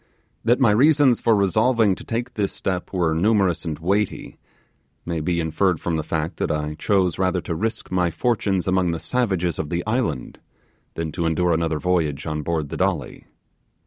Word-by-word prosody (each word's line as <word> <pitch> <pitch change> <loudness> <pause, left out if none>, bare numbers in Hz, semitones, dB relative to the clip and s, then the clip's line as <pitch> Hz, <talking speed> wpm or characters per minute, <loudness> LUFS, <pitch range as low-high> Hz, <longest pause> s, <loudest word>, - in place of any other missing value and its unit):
That 120 +3 +3
my 125 -6 +5
reasons 135 +2 +4
for 115 - +3
resolving 110 +2 +3
to - - -8
take 120 +2 -3
this 100 -2 -1
step 90 -2 -3
were 85 -4 +1
numerous 95 0 +2
and 80 -3 -3
weighty, 100 +5 -2 0.7
may 85 -1 -2
be 85 +2 -1
inferred 80 +2 +1
from 85 - -2
the 80 - 0
fact 80 +1 -3
that - - -1
I 75 0 -2
chose 95 +1 +1
rather 95 -1 +1
to 85 - -4
risk 110 +6 -3
my 90 -1 +2
fortunes 100 -3 0
among 95 -2 +2
the 85 - -3
savages 95 -9 -1
of 75 - -3
the 85 +1 -2
island 110 - -2 0.6
than 80 -1 -3
to 85 +1 -1
endure 85 +2 +1
another 80 -1 0
voyage 75 -4 0
on 75 -1 -2
board 80 -1 -2
the - - -5
Dolly. - - -2
90 Hz, 180 wpm, -22 LUFS, 80-105 Hz, 0.7 s, my